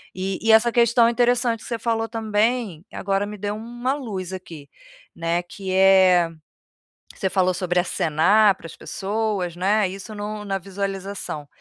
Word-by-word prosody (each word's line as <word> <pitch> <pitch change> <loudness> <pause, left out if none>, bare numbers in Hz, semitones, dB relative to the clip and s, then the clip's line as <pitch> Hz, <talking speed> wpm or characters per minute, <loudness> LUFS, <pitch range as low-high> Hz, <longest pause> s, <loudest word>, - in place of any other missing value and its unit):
E 190 +1 -2
e 225 - +3
essa 230 +2 +5
questão 235 0 +4
interessante 240 -1 +2
que - - -12
você 235 - -2
falou 225 -1 -1
também, 220 -4 -1
agora 195 +1 -1
me 210 +1 -7
deu 205 +1 -3
uma 240 +4 -3
luz 200 -10 -5
aqui, 165 -6 -9 0.5
né, 170 +1 -1
que 185 +2 -6
é, 185 -2 +5 0.8
você 190 - -2
falou 185 -1 +2
sobre 180 0 -2
acenar 185 +5 +3
para 165 - -11
as 165 - -11
pessoas, 200 -3 -3
né, 200 +3 +2
isso 195 +4 -8
no 210 0 -5
na 195 -1 -1
visualização. 195 -4 -5
200 Hz, 155 wpm, -23 LUFS, 185-225 Hz, 0.8 s, essa